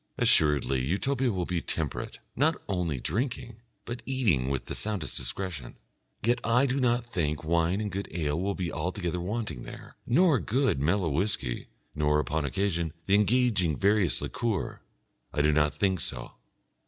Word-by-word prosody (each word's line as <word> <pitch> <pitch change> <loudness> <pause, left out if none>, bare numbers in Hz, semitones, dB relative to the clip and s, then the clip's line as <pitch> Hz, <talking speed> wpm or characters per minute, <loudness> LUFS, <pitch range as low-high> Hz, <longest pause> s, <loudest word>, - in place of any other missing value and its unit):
Assuredly 70 -4 +3
Utopia 125 - +1
will 90 -3 -1
be 85 -1 -1
temperate, 80 -4 -2 0.2
not 155 +5 +2
only 90 -8 -1
drinking, 120 - -3 0.3
but 120 +1 -5
eating 105 - +1
with 70 -2 -2
the - - -5
soundest 105 -7 -1
discretion. 70 +1 -4 0.5
Yet 120 +2 +2
I 120 +4 +4
do 135 +1 0
not 120 -1 +2
think 80 -10 -2
wine 85 +4 +2
and 105 -1 -2
good 100 +2 -3
ale 80 -1 -1
will 100 +1 -1
be 90 -3 -2
altogether 90 +1 -2
wanting 105 - -3
there, - - -10
nor 155 +1 +4
good, 130 - +1
mellow 85 +4 +2
whisky, 75 - -1 0.3
nor, 75 0 +2
upon 75 0 -1
occasion, 85 -2 -1
the 95 - +1
engaging 105 - +3
various 100 -4 +2
liqueur. 110 -5 -2 0.5
I 75 - +1
do 75 - +4
not 75 0 +3
think 95 -3 +1
so. 65 - -4
95 Hz, 155 wpm, -28 LUFS, 75-115 Hz, 0.5 s, I